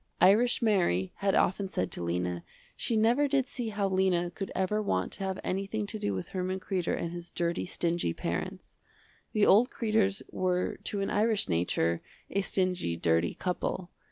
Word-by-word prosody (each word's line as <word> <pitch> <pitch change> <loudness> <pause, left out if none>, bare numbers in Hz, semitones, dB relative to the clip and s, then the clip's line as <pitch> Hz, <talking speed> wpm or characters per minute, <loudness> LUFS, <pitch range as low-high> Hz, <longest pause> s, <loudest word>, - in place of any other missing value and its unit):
Irish 235 +6 +5
Mary 175 - +2
had 195 -1 +1
often 195 +2 +2
said 90 - -2
to - - -4
Lena 90 0 -2 0.3
she 230 - -1
never 240 +7 +4
did 270 -2 +1
see 240 -3 -4
how 205 -2 0
Lena 185 -2 +2
could 195 +2 -5
ever 190 +3 +1
want 95 - 0
to - - -5
have 190 -1 -2
anything 195 +3 -2
to 215 +1 -5
do 100 - -1
with 95 - -5
Herman 185 0 -2
Kreder 185 -2 -1
and 170 - -3
his 175 0 -7
dirty 170 0 -1
stingy 170 - 0
parents. - - -4 0.5
The 210 -1 +4
old 230 +6 +6
Kreders 215 -4 +1
were 180 -1 0
to 200 - -2
an 195 - -1
Irish 215 0 +2
nature, 85 -1 +1 0.3
a 200 - +1
stingy, 185 - 0
dirty 85 0 +1
couple. 180 0 -3
190 Hz, 175 wpm, -30 LUFS, 170-210 Hz, 0.5 s, old